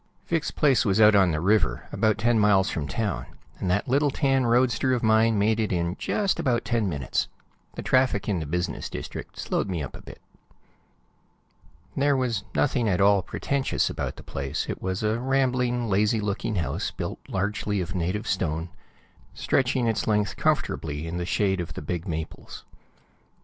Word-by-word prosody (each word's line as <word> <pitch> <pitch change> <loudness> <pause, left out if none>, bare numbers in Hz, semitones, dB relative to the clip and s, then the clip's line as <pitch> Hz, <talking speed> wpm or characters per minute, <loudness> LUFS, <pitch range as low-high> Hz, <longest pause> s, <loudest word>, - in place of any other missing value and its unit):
Vic's 165 -2 0
place 140 -5 +3
was 100 -3 +1
out 105 -1 +7
on 95 -3 +5
the 80 -2 0
river, 90 - +1
about 110 -1 +1
ten 115 +2 +2
miles 105 -2 +4
from 75 -3 -3
town, 100 - -2 0.3
and 95 - -2
that 105 +4 +1
little 140 +3 +3
tan 135 -2 +1
roadster 125 +1 +2
of 120 - -1
mine 110 0 +4
made 110 +2 +2
it 110 - 0
in 85 0 -1
just 200 -2 0
about 120 -3 0
ten 115 -5 0
minutes. 70 -7 -1 0.5
The - - -5
traffic 130 -6 +2
in 100 -5 0
the 80 - -4
business 90 +3 -2
district - - -7
slowed 100 - -1
me 85 -5 -2
up 70 - -7
a - - -10
bit. - - -12 1.8
There 140 0 +2
was 120 -6 -1
nothing 125 -5 +2
at 90 - +1
all 100 0 +5
pretentious 135 +8 -1
about - - -4
the - - -12
place; 70 -1 -3
it - - -5
was 95 +2 -2
a 110 +2 +1
rambling, 125 -2 +1
lazy 105 +2 +2
looking 105 +1 -2
house 85 -4 -1
built - - -5
largely 105 +1 -1
of 90 -1 -3
native 90 +4 -2
stone, 85 -2 -1 0.7
stretching 130 -1 +1
its 115 -2 0
length 105 -2 +1
comfortably 75 0 -1
in 85 +1 -4
the 90 0 -3
shade 95 -2 +1
of 85 -2 -7
the - - -5
big 85 +4 -4
maples. 80 -2 -6
105 Hz, 175 wpm, -26 LUFS, 90-120 Hz, 1.8 s, out